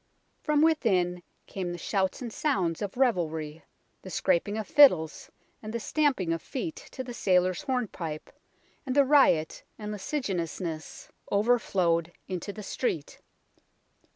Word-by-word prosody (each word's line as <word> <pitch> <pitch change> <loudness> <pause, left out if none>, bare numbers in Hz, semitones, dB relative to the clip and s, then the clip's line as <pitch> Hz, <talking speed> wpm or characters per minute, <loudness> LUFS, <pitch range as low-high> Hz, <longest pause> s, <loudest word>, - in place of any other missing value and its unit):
From 300 0 +2
within 185 - +2 0.2
came 185 -3 -4
the 175 - -5
shouts 190 +6 -1
and 235 -3 -6
sounds 185 - 0
of 205 +2 -4
revelry, 160 - 0 0.4
the 190 - -9
scraping 200 +3 +1
of 215 -3 -4
fiddles 180 - +5 0.3
and 215 - -6
the 235 - -2
stamping 255 - +1
of 165 - -3
feet 305 +4 -5 0.2
to 260 - -4
the 245 -1 -7
sailors' 185 -4 +2
hornpipe, 215 - -3 0.5
and 260 -2 -3
the 285 -1 +6
riot 260 - +4 0.2
and 210 -1 -6
licentiousness 185 - -4 0.2
over 230 +5 +3
flowed 170 -5 0 0.2
into 185 +2 -4
the 210 +1 -9
street. 170 - -3
195 Hz, 135 wpm, -28 LUFS, 170-255 Hz, 0.5 s, the